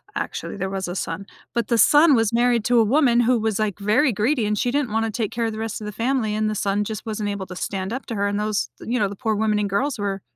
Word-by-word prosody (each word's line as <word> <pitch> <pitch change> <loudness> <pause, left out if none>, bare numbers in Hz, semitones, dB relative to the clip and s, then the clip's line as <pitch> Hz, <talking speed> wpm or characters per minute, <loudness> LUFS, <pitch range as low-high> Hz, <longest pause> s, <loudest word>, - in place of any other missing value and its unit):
actually, - - -4
there 190 0 -2
was 190 -1 -3
a 175 - -5
son. 185 +2 -4 0.3
But 235 -2 -1
the 235 - +2
son 295 +3 +6
was 225 -1 +2
married 240 -1 +2
to 240 -1 +4
a - - +6
woman 245 -1 +3
who 240 +1 +3
was, 220 -1 -1
like, 210 -2 -1
very 220 +6 +2
greedy, 225 +3 +1
and 210 0 0
she 245 - 0
didn't 280 -5 0
wanna 225 0 0
take 215 -2 -2
care 235 0 -2
of 225 - -1
the 215 - -6
rest 225 -1 -4
of - - -6
the 210 - -4
family, 230 0 -1
and 215 0 0
the 215 - -2
son 205 +1 0
just 220 +1 -5
wasn't 215 -1 -3
able 200 -2 -4
to 180 - -8
stand 190 +2 -3
up 260 - -5
to 230 - -4
her, 200 0 0
and 205 +1 -1
those 210 - -1
th - - -9
you 250 - +1
know, 200 -2 +1
the 200 - -7
poor 220 -1 -1
women 210 0 +1
and 205 -1 -1
girls 245 +5 -1
were 195 -1 -2
215 Hz, 300 wpm, -22 LUFS, 205-235 Hz, 0.3 s, son